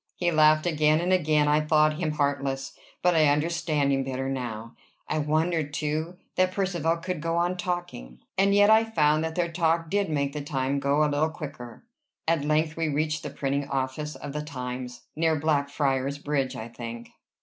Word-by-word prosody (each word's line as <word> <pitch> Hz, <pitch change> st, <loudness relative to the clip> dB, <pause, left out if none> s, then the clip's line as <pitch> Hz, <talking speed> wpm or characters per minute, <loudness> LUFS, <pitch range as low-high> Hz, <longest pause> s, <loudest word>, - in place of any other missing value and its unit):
He 175 Hz, -1 st, 0 dB
laughed 155 Hz, 0 st, +4 dB
again, 155 Hz, -2 st, +3 dB
and 180 Hz, +2 st, +1 dB
again 155 Hz, -4 st, +3 dB
I 150 Hz, +1 st, +3 dB
thought 155 Hz, 0 st, +3 dB
him 155 Hz, -4 st, -1 dB
heartless; 140 Hz, -2 st, -1 dB, 0.3 s
but 180 Hz, 0 st, +4 dB
I 155 Hz, -2 st, +5 dB
understand 150 Hz, -1 st, +1 dB
him 135 Hz, 0 st, +1 dB
better 130 Hz, 0 st, -3 dB
now. 120 Hz, -4 st, -4 dB, 0.3 s
I 155 Hz, -, -1 dB
wondered, 155 Hz, 0 st, 0 dB
too, 155 Hz, +4 st, -2 dB, 0.2 s
that 185 Hz, 0 st, +3 dB
Percivale 175 Hz, -4 st, 0 dB
could 175 Hz, -1 st, -4 dB
go 165 Hz, +1 st, -1 dB
on 175 Hz, +1 st, +1 dB
talking, 175 Hz, -, -4 dB, 0.2 s
and 200 Hz, +1 st, +3 dB
yet 205 Hz, +1 st, +6 dB
I 220 Hz, +1 st, +6 dB
found 155 Hz, -8 st, +2 dB
that 160 Hz, 0 st, -3 dB
their 170 Hz, -1 st, 0 dB
talk 165 Hz, -1 st, 0 dB
did 200 Hz, -2 st, +1 dB
make 140 Hz, -2 st, -1 dB
the 150 Hz, -, -4 dB
time 140 Hz, -1 st, -1 dB
go 140 Hz, +2 st, +2 dB
a -, -, +4 dB
little 150 Hz, +2 st, +1 dB
quicker. 140 Hz, -, -9 dB, 0.4 s
At 165 Hz, -3 st, +2 dB
length 155 Hz, +1 st, +1 dB
we 165 Hz, -1 st, -1 dB
reached 155 Hz, +1 st, -1 dB
the 145 Hz, -, -5 dB
printing 140 Hz, 0 st, -2 dB
office 135 Hz, +2 st, -3 dB
of 140 Hz, +1 st, -7 dB
"The 150 Hz, -, -2 dB
Times," 125 Hz, -3 st, -6 dB
near 160 Hz, 0 st, +2 dB
Blackfriars' 140 Hz, -2 st, 0 dB
Bridge, 140 Hz, -3 st, -1 dB
I 110 Hz, -1 st, -6 dB
think. 120 Hz, 0 st, -8 dB
150 Hz, 185 wpm, -26 LUFS, 140-165 Hz, 0.4 s, yet